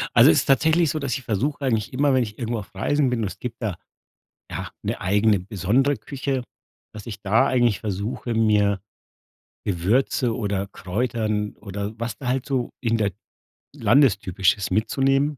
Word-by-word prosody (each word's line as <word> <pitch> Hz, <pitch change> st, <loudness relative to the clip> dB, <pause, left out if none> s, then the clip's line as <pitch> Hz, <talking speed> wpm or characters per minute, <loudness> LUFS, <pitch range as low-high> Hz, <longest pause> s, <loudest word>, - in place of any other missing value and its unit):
Also -, -, +8 dB
es 80 Hz, -, +4 dB
ist -, -, -1 dB
tatsächlich 160 Hz, +4 st, +3 dB
so, 155 Hz, -, -1 dB
dass 140 Hz, -3 st, -1 dB
ich 135 Hz, -, -10 dB
versuche 140 Hz, +7 st, -1 dB
eigentlich 110 Hz, -4 st, 0 dB
immer, 140 Hz, +1 st, +2 dB
wenn 130 Hz, -1 st, +3 dB
ich 105 Hz, -2 st, -8 dB
irgendwo 115 Hz, -1 st, -2 dB
auf 100 Hz, -, -11 dB
Reisen 145 Hz, -2 st, +1 dB
bin 125 Hz, -2 st, -1 dB
und 105 Hz, -, 0 dB
es -, -, -9 dB
gibt 125 Hz, 0 st, -6 dB
da, 105 Hz, -6 st, -2 dB, 0.7 s
ja, -, -, -5 dB
'ne -, -, -2 dB
eigene 100 Hz, +2 st, +3 dB
besondere 105 Hz, +9 st, +1 dB
Küche, 135 Hz, -2 st, -3 dB, 0.5 s
dass 105 Hz, -2 st, -9 dB
ich 110 Hz, -, -7 dB
da 105 Hz, +3 st, +3 dB
eigentlich 120 Hz, -5 st, +2 dB
versuche, 105 Hz, +3 st, -3 dB
mir 105 Hz, -3 st, +2 dB, 0.9 s
Gewürze 110 Hz, +6 st, +1 dB
oder 100 Hz, -3 st, -1 dB
Kräutern 105 Hz, +2 st, -2 dB
oder 100 Hz, 0 st, -5 dB
was 115 Hz, -2 st, -3 dB
da 130 Hz, -, -5 dB
halt 130 Hz, 0 st, 0 dB
so 130 Hz, -3 st, -1 dB
in 115 Hz, -2 st, +1 dB
der 105 Hz, -2 st, +1 dB, 0.6 s
Landestypisches 100 Hz, -7 st, +2 dB
mitzunehmen, 135 Hz, +5 st, +1 dB
115 Hz, 170 wpm, -23 LUFS, 100-130 Hz, 0.9 s, Also